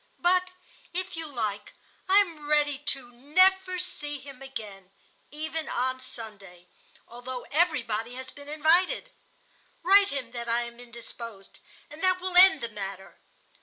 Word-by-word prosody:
But 365 +1 +3 0.5
if 370 0 -3
you 325 -1 -5
like, 215 -7 -3 0.4
I 385 - +6
am 325 -6 -5
ready 290 -2 +3
to 270 -4 -4
never 370 +9 +3
see 300 -5 -4
him 270 -1 -12
again, 210 -8 -8 0.4
even 315 +1 -4
on 260 +1 -1
Sunday, 205 -8 -10 0.4
although 245 +1 -7
everybody 245 -8 +1
has 260 0 -7
been 285 0 -12
invited. 345 +11 +2 0.7
Write 395 +3 +6
him 260 -4 -4
that 235 -1 -5
I 235 +1 +2
am 235 0 -9
indisposed, 235 -4 -10 0.3
and 300 +2 -12
that 370 -1 +4
will 370 0 -4
end 370 -4 +8
the 235 - -3
matter. 195 -2 -7
275 Hz, 140 wpm, -28 LUFS, 235-345 Hz, 0.7 s, end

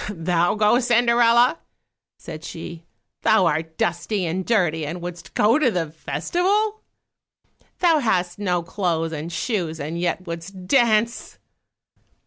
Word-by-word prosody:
"Thou 175 -1 0
go, 215 +3 +3
Cinderella!" 240 +2 +3 0.6
said 155 +1 -9
she; 165 0 -8 0.3
"Thou 215 -4 +4
art 160 0 -1
dusty 180 +3 -1
and 175 +3 -2
dirty 175 -8 +1
and 165 +4 -4
wouldst 175 -1 -8
go 230 +7 +4
to 300 - +3
the 170 -7 -2
festival? 385 - -1 1.0
Thou 335 -3 +3
hast 185 -7 0
no 180 -4 0
clothes 170 -3 -2
and 160 +2 -5
shoes, 170 -3 -2
and 155 +4 -4
yet 180 +1 -2
wouldst 180 +2 -8
dance!" 230 0 +1
180 Hz, 125 wpm, -22 LUFS, 165-230 Hz, 1.0 s, Thou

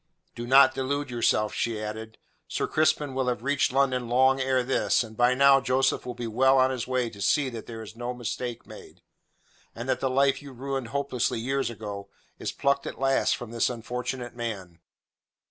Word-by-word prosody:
"Do 120 0 -6
not 135 +1 +7
delude 140 +1 -2
yourself," 110 -3 +1
she 115 -2 -2
added. 110 +1 -6 0.3
"Sir - - -2
Crispin 155 -2 +1
will 130 -1 -1
have 120 -2 -1
reached 140 -1 +1
London 130 -3 +1
long 130 +2 +4
ere 130 -1 +1
this, 130 -1 +1
and 110 -1 -11
by 120 +2 +3
now 140 0 +6
Joseph 130 -1 +1
will 125 - -5
be 120 - -5
well 130 +4 +3
on 130 0 +4
his 125 -3 -4
way 130 -1 0
to 100 -2 -11
see 140 - +2
that 115 -3 -8
there 115 -1 -7
is 110 +1 -11
no 120 +1 -4
mistake 120 0 -5
made, - - -13 0.7
and 120 +2 -6
that 130 -1 0
the 135 - 0
life 135 +2 +2
you 140 -2 -11
ruined 135 0 -4
hopelessly 125 -2 -1
years 135 +1 -1
ago 105 -3 -7 0.3
is - - -3
plucked 140 0 0
at - - -6
last 135 0 +2
from 120 -3 -8
this 115 -1 +1
unfortunate 125 +1 -5
man. 100 -8 -6
125 Hz, 195 wpm, -27 LUFS, 115-135 Hz, 0.7 s, not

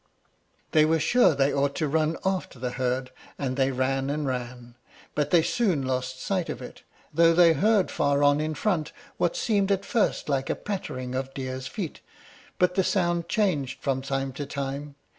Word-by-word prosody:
They 155 - +5
were 160 +1 +3
sure 245 - +4
they 140 +1 +2
ought 140 0 +1
to 155 - 0
run 155 +2 +1
after 190 -7 -1
the 125 0 -3
herd, 130 0 -2 0.3
and 130 -2 -2
they 135 0 +2
ran 135 +1 0
and 150 +1 -1
ran, 125 -2 -5 0.4
but 150 -1 0
they 170 -1 +5
soon 180 - +1
lost 130 0 -2
sight 185 -4 -1
of - - -4
it, 125 - -10 0.3
though 165 +2 +5
they 170 -1 +7
heard 205 +5 +2
far 145 0 +1
on 145 0 +4
in 155 0 -2
front 165 -4 -1 0.2
what - - +1
seemed 205 - +1
at 195 0 0
first 230 - 0
like 135 -2 -1
a - - +1
pattering 130 -11 -5
of 135 +1 -4
deer's 130 -1 -4
feet, 185 -8 -5 0.6
but 180 0 +3
the 190 0 +2
sound 175 -3 0
changed 170 -12 0
from 135 -2 -1
time 135 0 -2
to 145 +1 -5
time. 140 +1 -4
145 Hz, 185 wpm, -26 LUFS, 130-175 Hz, 0.6 s, they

